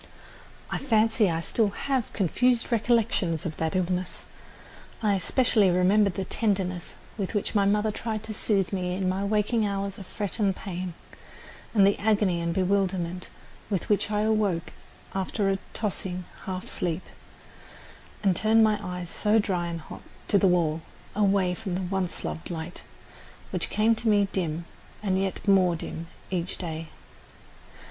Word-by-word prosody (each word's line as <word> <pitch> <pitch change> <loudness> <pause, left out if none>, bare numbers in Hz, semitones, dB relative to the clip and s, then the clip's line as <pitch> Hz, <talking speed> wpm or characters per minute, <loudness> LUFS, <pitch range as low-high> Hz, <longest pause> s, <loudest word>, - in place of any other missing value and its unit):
I - - -1
fancy 220 -4 +3
I 165 -1 -1
still 215 +4 +1
have 260 +3 -1
confused 235 +6 +1
recollections 220 -8 +1
of 160 -2 -4
that 160 +2 -1
illness. 180 0 -1 0.8
I 210 -2 +3
especially 205 +1 +3
remember 190 +3 +4
the 190 +1 -3
tenderness 190 -5 -1 0.2
with 195 +2 -2
which 205 - 0
my 200 -2 +3
mother 210 +2 +2
tried 220 0 -4
to 220 0 -4
soothe 200 -3 +1
me 180 -1 -1
in 190 0 -1
my 190 +2 0
waling 215 +2 +1
hours 200 -1 -2
of 190 - -9
fret 205 +2 -4
and 200 -3 +2
pain, 180 -3 -5 0.8
and 200 -2 +7
the 200 - +3
agony 200 -5 +2
and 170 0 0
bewilderment 185 -1 0 0.4
with 195 -4 -2
which 205 -1 +2
I 210 0 +1
awoke 210 -6 +1 0.4
after 195 +1 0
a 195 - -1 0.2
tossing 185 -4 -3 0.2
half 185 -1 -4
sleep, 175 0 -2 1.2
and 195 -3 +3
turned 220 +3 +4
my 215 -1 +3
eyes, 180 -3 -5
so 210 +1 +2
dry 185 -5 0
and 170 -1 -4
hot, - - -10 0.3
to 200 - +5
the 195 - +4
wall 165 -3 +2 0.3
away 195 -3 +3
from 190 -2 -4
the 185 - -1
once 185 -1 -2
loved 160 - -4
light, 165 0 -5 0.7
which - - -1
came 220 +2 +3
to 225 0 0
me 205 -1 +4
dim 170 -2 -2 0.4
and 190 -2 +1
yet 195 +2 -3
more 185 -3 +5
dim 165 +1 -6 0.2
each 180 -1 -1
day. 165 -2 -5
195 Hz, 155 wpm, -27 LUFS, 180-210 Hz, 1.2 s, and